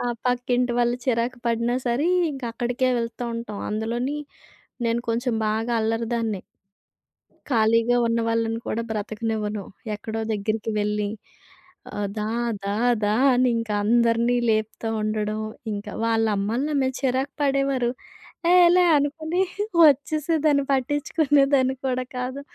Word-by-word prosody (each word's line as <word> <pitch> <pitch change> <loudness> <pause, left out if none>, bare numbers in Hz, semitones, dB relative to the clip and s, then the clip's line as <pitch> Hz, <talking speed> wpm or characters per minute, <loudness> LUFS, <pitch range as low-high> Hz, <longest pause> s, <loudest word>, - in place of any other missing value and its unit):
ఆ! - - -2 0.2
పక్కింటి 245 0 +1
వాళ్లు 240 0 +2
చిరాకు 245 0 0
పడినా 235 +1 +1
సరే, 245 +7 +1 0.3
ఇంక 270 -1 -8
అక్కడికే 245 +2 0
వెళ్తూ 230 +1 -4
ఉంటాం. 220 -3 -5
అందులో 220 +2 -2 0.9
నేను 230 +1 +1
కొంచెం 235 +1 0
బాగా 225 +2 -1
అల్లరి 225 +1 0
దాన్ని. 225 -4 -1 1.1
ఖాళీగా 230 0 +3
ఉన్న 230 0 +1
వాళ్లని 230 0 0
కూడా 230 - -1
బ్రతకనివ్వను. 215 -1 -3 0.3
ఎక్కడో 220 +1 -5
ఒక 220 - -5
దగ్గరికి 215 +2 -2
వెళ్లి 210 0 -1 0.8
ఆహ్, 205 -1 -2
"దా, 210 - -1 0.4
దా, 200 - -1 0.3
దా!" 210 +1 +2 0.2
అని 250 +1 +3
ఇంకా 230 -2 -3
అందరినీ 235 +2 +3
లేపుతూ 220 +1 -1
ఉండడం. 215 0 -1 0.3
ఇంక 205 0 -4 0.2
వాళ్ల 225 -1 +2
అమ్మలైనా 235 +10 -1
నా - - 0
మీద 260 0 +1
చిరాకు 265 +1 0
పడేవారు. 275 -3 +1 0.6
"ఏహ్! 360 - +7
ఏలే" 355 +1 +5
అనుకుని 315 +5 -1 0.4
వచ్చేసేదాన్ని, 300 0 +3
పట్టించుకునేదాన్ని 275 0 +2
కూడా 255 0 0
కాదు. 255 +3 -4
235 Hz, 130 wpm, -24 LUFS, 220-260 Hz, 1.1 s, ఏహ్